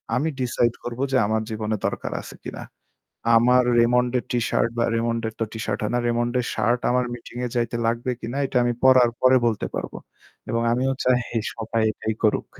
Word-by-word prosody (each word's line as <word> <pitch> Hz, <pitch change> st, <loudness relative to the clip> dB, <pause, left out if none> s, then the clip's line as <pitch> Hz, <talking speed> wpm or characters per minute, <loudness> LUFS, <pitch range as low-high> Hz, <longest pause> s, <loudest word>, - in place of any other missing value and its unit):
আমি 150 Hz, +5 st, +1 dB
ডিসাইড 120 Hz, -1 st, +1 dB
করব 120 Hz, 0 st, -6 dB
যে 130 Hz, -, +3 dB
আমার 110 Hz, +1 st, 0 dB
জীবনে 110 Hz, 0 st, -2 dB
দরকার -, -, -2 dB
আছে -, -, -11 dB
কিনা? -, -, -7 dB, 0.7 s
আমার 125 Hz, +2 st, +5 dB, 0.2 s
রেমন্ডের 125 Hz, +1 st, +2 dB
টি 120 Hz, -, +1 dB
শার্ট 115 Hz, -, +1 dB
বা 120 Hz, -, +2 dB
রেমন্ডের 115 Hz, -1 st, -1 dB
তো -, -, +1 dB
টিশার্ট 110 Hz, -2 st, -3 dB
হয়না। 120 Hz, +3 st, 0 dB
রেমন্ডের 120 Hz, +1 st, 0 dB
শার্ট 120 Hz, +3 st, +1 dB
আমার 125 Hz, 0 st, +2 dB
মিটিং 120 Hz, 0 st, -10 dB
এ -, -, -1 dB
যাইতে 120 Hz, -1 st, 0 dB
লাগবে 120 Hz, +2 st, -1 dB
কিনা 120 Hz, +4 st, -4 dB
এটা 130 Hz, -, -1 dB
আমি 120 Hz, 0 st, +1 dB
পড়ার 130 Hz, -2 st, +6 dB
পরে 130 Hz, 0 st, +6 dB
বলতে 115 Hz, -3 st, 0 dB
পারবো। -, -, -5 dB, 0.5 s
এবং 115 Hz, +1 st, 0 dB
আমিও 130 Hz, +3 st, +1 dB
চাই 125 Hz, -1 st, +3 dB, 0.3 s
সবাই 115 Hz, 0 st, -2 dB
এটাই 110 Hz, 0 st, -4 dB
করুক। 105 Hz, -, +2 dB
120 Hz, 180 wpm, -23 LUFS, 115-125 Hz, 0.7 s, পড়ার